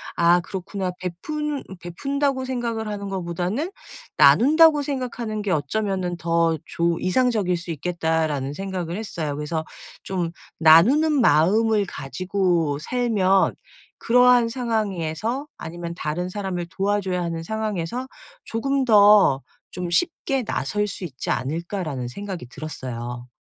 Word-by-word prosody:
'아 170 +1 +5
그렇구나. 190 +1 -4
베푼 290 - -4 0.2
베푼다고 275 +8 -2
생각을 235 -4 -3
하는 200 -1 -4
것보다는 185 - -2 0.5
나눈다고 305 +3 +6
생각하는 245 -6 -3
게 200 - -1
어쩌면은 180 +3 -1
더 165 -1 +1
좋 170 0 0
이상적일 205 -3 +1
수 170 0 -9
있겠다.'라는 160 -3 -1
생각을 185 -1 -4
했어요. 160 -9 -4
그래서 155 +2 -3 0.4
'좀 175 -3 -2 0.3
나누는 215 - +6
마음을 205 +7 +4
가지고 175 -1 -1
살면 195 -2 +2 0.4
그러한 245 -1 +5
상황에서 225 - -2
아니면 170 +1 -6
다른 175 +2 -3
사람을 185 -3 -4
도와줘야 195 -2 -1
하는 165 -1 -3
상황에서 220 +3 -3 0.4
조금 275 +4 0
더 205 - +6 0.3
좀 180 -1 -5
쉽게 270 - 0
나설 210 -1 -1
수 195 - -7
있지 130 -7 -6
않을까.'라는 155 - -2
생각이 185 -1 -6
들었어요. 120 -4 -6
190 Hz, 290 characters per minute, -23 LUFS, 165-225 Hz, 0.5 s, 나눈다고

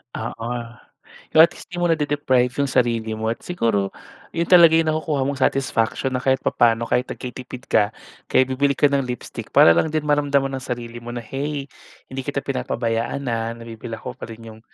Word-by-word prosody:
Oo, 115 0 -5 0.8
pero, 155 - +7
at 170 - +4
least, - - -12
'di 175 - -4
mo 175 - +2
nade-deprive 145 -5 +1
yung 140 - +2
sarili 115 -3 +1
mo. 110 0 -3
At - - -7
siguro, 115 - 0 0.4
'yon 170 0 -1
talaga 170 -3 +7
yung 165 -1 +3
nakukuha 155 -3 -1
mong 140 -1 -3
satisfaction, 130 -1 0
na 125 - -2
kahit 130 0 +2
papa'no, 115 0 +2
kahit 125 +1 +1
nagtitipid 125 0 -8
ka, 105 0 +3 0.4
kaya 130 - +5
bibili 140 +1 +1
ka 145 - +4
ng 140 -1 +2
lipstick, 125 -1 -6
para 85 - +7
lang 160 - +1
din 155 -1 0
maramdaman 140 -2 +2
ng 130 - -6
sarili 120 -1 -5
mo 120 - -6
na, 120 - -4
"Hey, 140 +4 -4 0.4
hindi 135 0 -3
kita 140 0 -2
pinapabayaan, 125 0 -2
ah, 115 -1 -1
nabibili 115 0 -8
ko 125 0 -7
pa - - -8
rin 115 0 -10
yung, - - -16
130 Hz, 190 wpm, -22 LUFS, 115-145 Hz, 0.8 s, pero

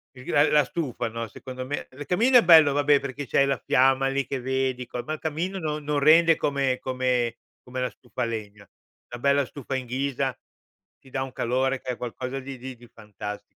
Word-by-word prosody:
Il 125 - -12
gra 145 - +3
ehm, - - 0
la 150 -2 +5
stufa, 125 -5 -3
no, 115 0 -5
secondo 130 +2 -8
me 145 +2 -4
il 145 +2 -9
camino 235 - +4
è 235 - +6
bello 160 -5 +7
vabbè 145 0 +4
perché 140 +1 -6
c'hai 140 +3 +3
la 135 -2 0
fiamma 135 +1 +3
lì 135 -1 -1
che 135 -2 -4
vedi, 130 -1 -1
co 125 - -5
ma 155 - -4
il - - -5
camino 165 +5 -3
non 150 -3 -3
non 150 -1 0
rende 165 +3 +6
come 135 -3 0
come 125 -2 -1 0.3
come 130 +1 -6
la 125 - 0
stufa 125 0 -6
a - - +1
legna. 105 -3 -6 0.4
Una 120 - -7
bella 140 0 +3
stufa 135 -1 -6
in 130 -1 -3
ghisa 135 0 -2 0.6
ti 135 - -19
dà 130 0 -2
un 135 - -7
calore 130 +3 0
che 130 -1 -4
è 120 - -5
qualcosa 125 +2 -5
di 135 0 -8
di 130 +1 -8
di 120 0 -16
fantasti 105 -1 -8
130 Hz, 220 wpm, -25 LUFS, 125-145 Hz, 0.6 s, bello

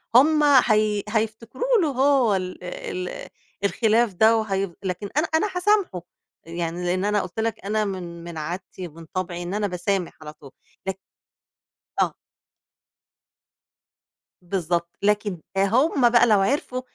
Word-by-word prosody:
هُم 300 +4 +6
هي 215 -7 +4
هييفتكروا 225 - 0
له 320 - +2
هو 265 -5 +3
ال 185 -1 -4
ال 180 0 -5 0.4
الخلاف 220 +1 +2
ده 220 +5 +5
وهي 195 -4 -1
لكن 190 +2 -3
أنا 305 - +3
أنا 370 +6 +2
هاسامحه 360 - +2 0.4
يعني، 170 +1 -4
لإن 185 +2 0
أنا 205 0 +2
قُلت 185 +4 -7
لَك 220 -3 -2
أنا 215 +1 0
من 175 -3 -6
من 170 -2 -8
عادتي 180 +3 -5
ومن 165 +1 -13
طبعي 175 -2 -3
إن 175 +2 -5
أنا 210 0 0
باسامح 180 0 -2
على 150 -1 -8
طول، 145 -3 -15 0.4
لك 190 - -1 1.1
آه. - - +1 2.3
بالضبط، 175 -2 -2
لكن 205 -3 0 0.2
هُم 240 +6 +3
بقى 240 0 +5
لو 210 -3 +5
عرفوا 255 +3 0
200 Hz, 135 wpm, -24 LUFS, 180-230 Hz, 2.3 s, هُم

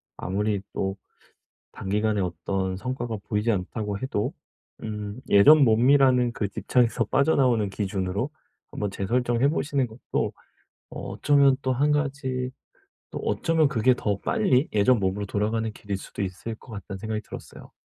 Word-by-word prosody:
아무리 100 +2 -1
또 95 0 -2 0.8
단기간에 105 +1 -1
어떤 95 +1 -2
성과가 120 0 -4
보이지 105 +2 +1
않다고 105 +1 -3
해도 105 -3 -2 0.5
음 105 +1 -5
예전 145 +10 +7
몸이라는 125 +1 +4
그 105 -3 -2
집착에서 115 +2 +1
빠져나오는 125 -4 +2
기준으로 95 +4 -2 0.4
한번 105 - -2
재설정해 120 +6 +1
보시는 140 -4 0
것도 115 +2 -3 0.6
어 - - -7
어쩌면 140 -2 +4
또 130 - +1
1 145 +4 +2
가지 135 -3 -1 0.6
또 - - -5
어쩌면 160 -2 +1
그게 130 -2 +3
더 105 -4 -1
빨리 125 +7 +2
예전 110 +3 +4
몸으로 100 +1 -1
돌아가는 110 +2 -1
길일 100 -2 -5
수도 100 - -6
있을 95 +4 -5
것 115 - -16
같다는 100 -2 -7
생각이 110 +1 -3
들었어요. - - -11
110 Hz, 320 characters per minute, -25 LUFS, 100-130 Hz, 0.8 s, 예전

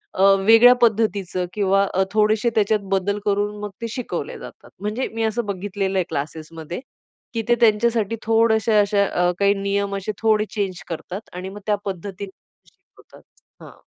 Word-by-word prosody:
अ, 190 - +2 0.2
वेगळ्या 225 +3 +8
पद्धतीच 215 -5 +1 0.2
किंवा 195 -1 +2
अ, 190 - +2
थोडेशे 215 +2 +2
त्याच्यात 215 0 +2
बदल 195 +2 0
करून 205 0 0
मग 210 - -4
ते 230 - -2
शिकवले 250 0 -5
जातात. - - -12
म्हणजे 210 +5 -2
मी 225 0 -2
असं 220 +1 -1
बघितलेलं 195 0 -3
आहे 185 - +1
क्लासेस 155 +2 -5
मध्ये 165 +1 -6 0.5
की 230 - -1
ते 240 - +4
त्यांच्यासाठी 225 0 +2
थोडेसे 225 0 +2
अशा 200 0 +2
अ, 180 -2 +1
काही 200 0 +4
नियम 200 0 -1
असे 195 +2 -3
थोडे 215 -1 +3
चेंज 195 -4 -3
करतात 180 +5 -7
आणि 180 +1 -6
मग 205 +1 -9
त्या 210 - +3
पद्धतीने 195 +1 -6 0.4
शिकवतात. - - -21 0.4
हां. - - -15
205 Hz, 165 wpm, -22 LUFS, 195-220 Hz, 0.5 s, वेगळ्या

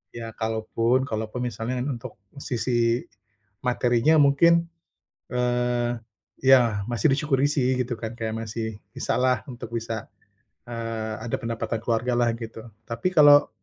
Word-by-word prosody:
Ya 115 -1 -6
kalaupun 115 +3 0
kalaupun 110 +1 -3
misalnya 125 +2 -3
untuk 130 -4 -5 0.2
sisi 120 -1 0 0.6
materinya 125 +4 +3
mungkin, 170 +4 +5 0.6
eee, 120 -1 +1 0.5
ya 120 -6 +5
masih 115 -4 +2
disyukuri 140 -1 +2
sih, 130 -3 +1
gitu 120 0 -3
kan, 110 0 -5
kayak 110 -1 -2
masih 110 -1 -4 0.2
bisa - - -1
lah 130 0 +2
untuk 120 -2 -8
bisa, 115 -1 -4 0.6
eee, 115 -2 -4 0.2
ada - - 0
pendapatan 115 0 -2
keluarga 120 +1 0
lah 120 -1 +3
gitu. 115 0 -8 0.2
Tapi 120 +11 -1
kalau, 145 -3 +7
120 Hz, 130 wpm, -25 LUFS, 115-130 Hz, 0.6 s, kalau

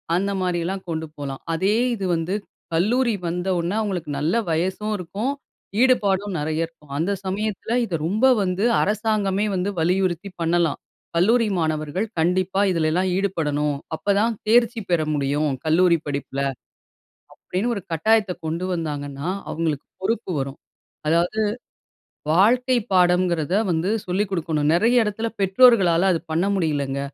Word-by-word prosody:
அந்த 200 +2 0
மாதிரியெல்லாம் 180 +1 -2
கொண்டு 160 0 -2
போலாம். 140 -2 -6
அதே 195 +6 +1 0.2
இது 195 -3 -4
வந்து 165 +4 -2 0.4
கல்லூரி 235 +7 +2
வந்த 180 +2 -3
உடன 175 +5 -1
அவங்களுக்கு 185 -7 -3
நல்ல 160 +8 0
வயசும் 190 +6 -1
இருக்கும். 195 +9 -3 0.5
ஈடுபாடும் 205 -6 +2
நெறைய 160 +2 -1
இருக்கும். 155 -3 -19
அந்த 175 +6 0
சமயத்தில 210 +3 -2
இதை 175 - -3
ரொம்ப 215 +9 +1 0.2
வந்து 190 +3 0 0.2
அரசாங்கமே 210 -1 0
வந்து 185 +2 -1
வலியுறுத்தி 180 +2 0
பண்ணலாம். 165 -1 +1 0.4
கல்லூரி 225 +6 +3
மாணவர்கள் 155 +5 -1
கண்டிப்பா 185 +3 +1
இதுலெல்லாம் 170 +2 +1
ஈடுபடணும். 150 -7 0 0.2
அப்பதான் 205 +6 +1
தேர்ச்சி 235 0 +4
பெற 170 -2 +3
முடியும் 145 +1 0 0.2
கல்லூரி 170 +2 +4
படிப்பில. 140 -1 -3 0.9
அப்படின்னு 200 +7 -3
ஒரு 200 - -5
கட்டாயத்தை 205 +3 +2
கொண்டு 165 +3 -2
வந்தாங்கன்னா 145 -3 -4 0.2
அவங்களுக்கு 155 -2 -2
பொறுப்பு 220 0 -1
வரும். 135 +1 -4 0.5
அதாவது 170 +7 +1 0.9
வாழ்க்கை 245 +8 +4 0.2
பாடம்ங்கிறதை 180 -2 +2 0.2
வந்து 165 +4 0 0.2
சொல்லி 185 +3 0
குடுக்கணும். 160 -5 0
நெறைய 230 +6 +4
இடத்தில 220 +2 -2
பெற்றோர்களால 190 -4 +5
அது 165 - 0
பண்ண 170 +4 +1
முடியலங்க. 145 -6 -1
180 Hz, 125 wpm, -23 LUFS, 160-205 Hz, 0.9 s, பெற்றோர்களால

